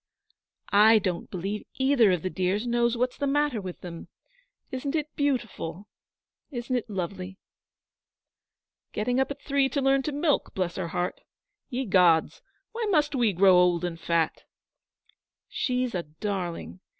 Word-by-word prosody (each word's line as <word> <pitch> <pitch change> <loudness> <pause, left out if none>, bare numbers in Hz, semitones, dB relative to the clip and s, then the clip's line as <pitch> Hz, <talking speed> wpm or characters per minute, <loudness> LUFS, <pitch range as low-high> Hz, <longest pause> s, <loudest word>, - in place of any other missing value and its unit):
'I 215 +2 +7
don't 185 -4 -2
believe 195 +4 -4
either 265 -6 +4
of 180 -3 0
the 185 - -1
dears 190 +4 0
know 240 0 +2
what's 245 +2 -1
the 285 - 0
matter 290 -5 +1
with 185 -2 -7
them. 170 -2 -8 0.6
Isn't 275 +3 -3
it 305 -1 -3
beautiful? 225 - -2 0.6
Isn't 250 -1 -3
it 240 -2 -2
lovely?' 190 -1 -5 1.6
'Getting 245 +4 0
up 265 - +1
at 285 0 -7
three 275 -1 +2
to 285 - -1
learn 270 0 +3
to 300 - -3
milk, 295 +1 0
bless 180 -2 -1
her 185 -3 -2
heart! 175 +1 -3 0.5
Ye 260 0 -2
gods, 180 -5 +3 0.3
why 455 -1 -3
must 300 -5 +2
we 240 -5 +2
grow 190 0 +5
old 180 -1 +4
and 165 -2 -4
fat?' 165 -1 0 1.0
'She's 250 -2 -1
a 180 - -1
darling. 175 +2 -5
215 Hz, 150 wpm, -27 LUFS, 180-270 Hz, 1.6 s, I